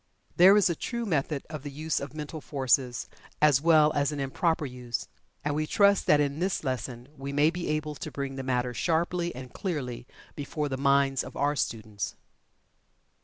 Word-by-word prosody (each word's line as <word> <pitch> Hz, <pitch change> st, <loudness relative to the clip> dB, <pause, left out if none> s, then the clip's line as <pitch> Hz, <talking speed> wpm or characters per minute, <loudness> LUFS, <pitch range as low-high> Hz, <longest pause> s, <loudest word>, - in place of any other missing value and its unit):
There 190 Hz, +4 st, +8 dB
is 205 Hz, -, +5 dB
a 175 Hz, -, +1 dB
true 235 Hz, +8 st, -4 dB
method 150 Hz, -5 st, -1 dB
of 155 Hz, -3 st, -6 dB
the 145 Hz, -, -6 dB
use 155 Hz, +3 st, -2 dB
of 140 Hz, +1 st, -7 dB
mental 155 Hz, +1 st, -6 dB
forces, 130 Hz, -3 st, 0 dB, 0.3 s
as 145 Hz, -3 st, +5 dB
well 155 Hz, -2 st, +5 dB
as 145 Hz, 0 st, +1 dB
an 145 Hz, -, -4 dB
improper 155 Hz, +4 st, 0 dB
use, 125 Hz, -2 st, -5 dB, 0.4 s
and 145 Hz, -, +1 dB
we 155 Hz, +1 st, -1 dB
trust 200 Hz, +2 st, +4 dB
that 150 Hz, -, +6 dB
in 145 Hz, 0 st, 0 dB
this 185 Hz, -1 st, -1 dB
lesson 125 Hz, -2 st, -4 dB
we 135 Hz, 0 st, -6 dB
may 145 Hz, +3 st, +3 dB
be 175 Hz, 0 st, -4 dB
able 155 Hz, 0 st, -1 dB
to -, -, -6 dB
bring 140 Hz, -1 st, -4 dB
the 135 Hz, -, -4 dB
matter 125 Hz, -1 st, -1 dB
sharply 170 Hz, +4 st, 0 dB
and 125 Hz, -1 st, -9 dB
clearly 135 Hz, -11 st, -4 dB, 0.3 s
before 145 Hz, +1 st, -3 dB
the 135 Hz, -, -2 dB
minds 140 Hz, -1 st, +2 dB
of -, -, -9 dB
our 145 Hz, +1 st, +1 dB
students. 110 Hz, -6 st, -3 dB
145 Hz, 185 wpm, -28 LUFS, 135-160 Hz, 0.4 s, There